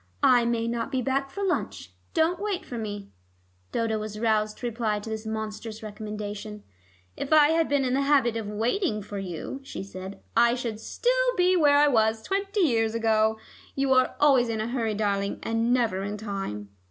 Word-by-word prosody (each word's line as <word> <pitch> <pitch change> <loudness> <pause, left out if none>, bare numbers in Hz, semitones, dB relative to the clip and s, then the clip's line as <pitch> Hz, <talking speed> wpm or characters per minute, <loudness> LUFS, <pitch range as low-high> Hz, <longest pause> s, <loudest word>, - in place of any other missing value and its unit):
"I 245 -2 +5
may 230 -1 0
not 230 0 -2
be 255 -1 0
back 275 +2 0
for 400 +8 -5
lunch. 380 -2 -2 0.2
Don't 335 +2 +2
wait 410 -3 -2
for 245 - -7
me." 205 -2 -6 0.6
Dodo 225 -1 0
was 215 0 -6
roused 215 -2 +1
to - - -7
reply 225 -3 -1
to 210 +2 -6
this 220 0 -5
monstrous 220 0 -5
recommendation. 210 0 -6 0.5
"If 280 - -5
I 305 -1 +7
had 325 0 +2
been 280 -2 +2
in 250 - 0
the 275 - +2
habit 275 -5 +3
of 225 -2 -3
waiting 220 - -1
for 205 0 -6
you," 185 - -5
she 270 - -7
said, 190 0 -8 0.2
"I 235 +1 +5
should 235 -4 -4
still - - 0 0.2
be 365 +1 +4
where 290 -4 +5
I 295 +1 +6
was 220 -4 +2
twenty 395 +1 -1
years 225 -8 +2
ago. 220 -1 +2 0.4
You 275 -1 +2
are 255 0 +3
always 265 -5 +4
in 225 -1 -2
a 220 +2 -2
hurry, 230 -4 -1
darling, 200 -1 -1
and 225 +1 0
never 230 -7 +1
in 205 +1 -4
time." 195 - -5
225 Hz, 190 wpm, -26 LUFS, 215-270 Hz, 0.6 s, I